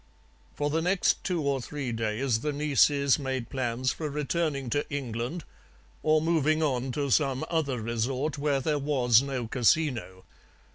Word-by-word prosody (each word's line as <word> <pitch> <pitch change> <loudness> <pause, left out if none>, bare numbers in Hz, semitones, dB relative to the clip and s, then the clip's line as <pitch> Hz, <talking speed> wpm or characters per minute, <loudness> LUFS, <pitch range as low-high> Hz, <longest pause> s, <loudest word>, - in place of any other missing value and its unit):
"For 145 0 -1
the 160 +2 +1
next 180 +2 +1
two 175 -4 -1
or 140 -2 0
three 135 0 -4
days 115 +2 -1
the 150 +5 -2
nieces 145 -1 +3
made 130 -3 -3
plans 130 -1 -1
for 155 -2 -4
returning 150 -1 -1
to 145 +3 -1
England 130 +3 -3 0.6
or 155 0 +3
moving 160 -1 +2
on 130 -3 0
to 140 -1 -2
some 135 +1 +2
other 145 -7 0
resort 125 +7 -2
where 140 -2 +1
there 150 +2 0
was 130 -5 +3
no 135 -3 -3
casino. 120 -6 +1
140 Hz, 150 wpm, -28 LUFS, 125-150 Hz, 0.6 s, nieces